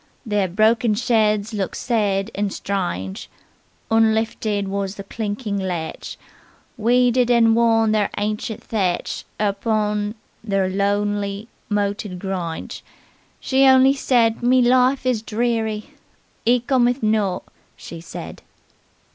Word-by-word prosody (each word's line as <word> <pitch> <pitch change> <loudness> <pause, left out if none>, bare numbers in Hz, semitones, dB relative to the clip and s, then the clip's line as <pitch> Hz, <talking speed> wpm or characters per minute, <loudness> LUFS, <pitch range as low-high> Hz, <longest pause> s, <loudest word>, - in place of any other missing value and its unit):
Ther 205 -3 +1
broken 215 +4 +2
sheds 215 -2 +1
looked 200 -3 -3
sed 210 -3 0
and 200 0 -2
stringe; 175 - -4 0.6
Unlifted 220 -2 +1
was 195 0 -3
the 200 - -7
clinking 205 0 -4
latch; 175 -4 -5 0.6
Weeded 245 +1 +3
and 230 -2 +4
worn 225 -1 +3
their 210 -2 +1
ancient 210 +1 -3
thatch 190 -6 -2
Er 205 -1 +1
pon 210 0 -1 0.3
ther 195 -3 0
lownely 205 +1 -1 0.2
moated 205 -2 -2
gringe, 180 -3 -5 0.6
She 270 0 +3
only 265 +1 +6
said 240 -4 +1
'Me 250 +1 +4
life 255 +2 +3
is 250 -4 +1
dreary, 220 -1 -2 0.6
'E 245 0 +4
cometh 245 0 +1
not,' 215 -4 +1 0.3
she 165 -1 -9
said." 165 - -9
215 Hz, 115 wpm, -21 LUFS, 200-235 Hz, 0.6 s, only